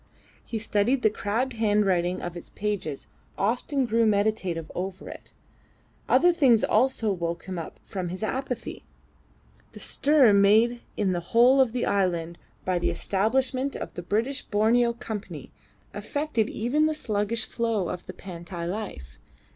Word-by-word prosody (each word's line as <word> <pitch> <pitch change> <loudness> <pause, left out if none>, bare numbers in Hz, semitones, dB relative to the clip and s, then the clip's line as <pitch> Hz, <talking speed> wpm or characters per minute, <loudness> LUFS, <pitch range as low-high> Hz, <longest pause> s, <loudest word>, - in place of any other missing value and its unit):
He 230 - -4
studied 225 +4 +1
the 215 - +4
crabbed 230 +5 -2
handwriting 200 -5 +1
of 175 0 -5
its 175 - -9
pages 200 -9 -3
and - - -34 0.3
often 255 +5 0
grew 230 0 +2
meditative 200 -6 0
over 185 +1 -5
it. - - -11 0.8
Other 355 0 +5
things 260 -10 +4
also 225 -2 +2
woke 170 -2 -4
him 185 -2 -4
up 165 - -8
from 185 -3 -4
his 185 +4 -6
apathy. 250 +1 -4 0.9
The - - -10
stir 280 -7 +4
made 220 +4 +4 0.2
in 200 -3 +1
the 175 - 0
whole 240 +9 +4
of 255 -4 +2
the 245 +1 -1
island 170 -4 0 0.3
by 185 -1 +1
the - - 0
establishment 255 +7 0
of - - -6
the - - -6
British 225 +10 -1
Borneo 235 +3 +2
Company 220 -3 -7 0.4
affected 290 -7 -1
even 280 +8 +1
the 310 - -1
sluggish 220 -3 -1
flow 225 -6 -1
of 180 - -5
the - - -7
Pantai 175 -1 -7
life. 175 - -6
215 Hz, 150 wpm, -26 LUFS, 185-240 Hz, 0.9 s, Other